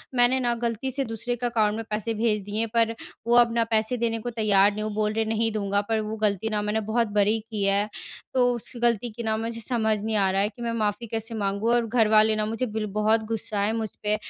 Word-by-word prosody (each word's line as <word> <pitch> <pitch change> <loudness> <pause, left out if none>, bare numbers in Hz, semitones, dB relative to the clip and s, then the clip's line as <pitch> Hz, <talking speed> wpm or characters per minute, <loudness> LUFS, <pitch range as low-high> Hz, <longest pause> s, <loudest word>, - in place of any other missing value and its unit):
मैंने 245 +1 +4
न, 240 -1 +1
गलती 235 +2 -2
से 275 +2 +1
दूसरे 230 +1 -3
के 245 +1 -4
अकाउंट 220 -3 +1
में 225 - -4
पैसे 215 +2 -2
भेज 215 -1 0
दिए 205 +2 -4
हैं। 230 - +1
पर 230 -1 +3 0.4
वो 240 - +4
अब 240 -1 +7
अपना 230 0 +1
पैसे 220 +3 +2
देने 230 -1 -1
को 240 - -4
तैयार 210 -4 +3
नहीं 210 - -6
है। - - -2
वो 215 - -2
बोल 210 0 0
रहे 225 +1 +1
हैं 220 - -4
नहीं 225 0 +1
दूँगा, 200 -1 0
पर 220 +2 -1
वो 215 +1 -4
गलती 210 0 0
न 210 0 0
मैंने 210 +1 0
बहुत 230 +1 +1
बड़ी 210 +2 +3
की 215 -2 -5
है। 200 +1 +2 0.5
तो 250 -1 +3
उसकी 240 +1 -7
गलती 235 0 +1
की 235 +2 -7
न 220 - 0
मुझे 230 +1 -4
समझ 220 -3 0
नहीं 220 +1 -2
आ 195 -2 +3
रहा 195 +1 +1
है, 205 - +1
कि 240 - -14
मैं 235 -1 -1
माफ़ी 215 0 -1
कैसे 225 +1 -4
माँगूँ? 200 +2 0
और 240 -1 +2
घर 225 -1 +3
वाले 215 0 +5
न 215 0 -1
मुझे 225 +3 -1
बिल 220 -2 -3
बहुत 220 +1 +3
गुस्सा 215 -2 -2
हैं 210 +2 +1
मुझ 225 -1 -2
पे 210 0 +2
220 Hz, 270 wpm, -25 LUFS, 210-235 Hz, 0.5 s, अब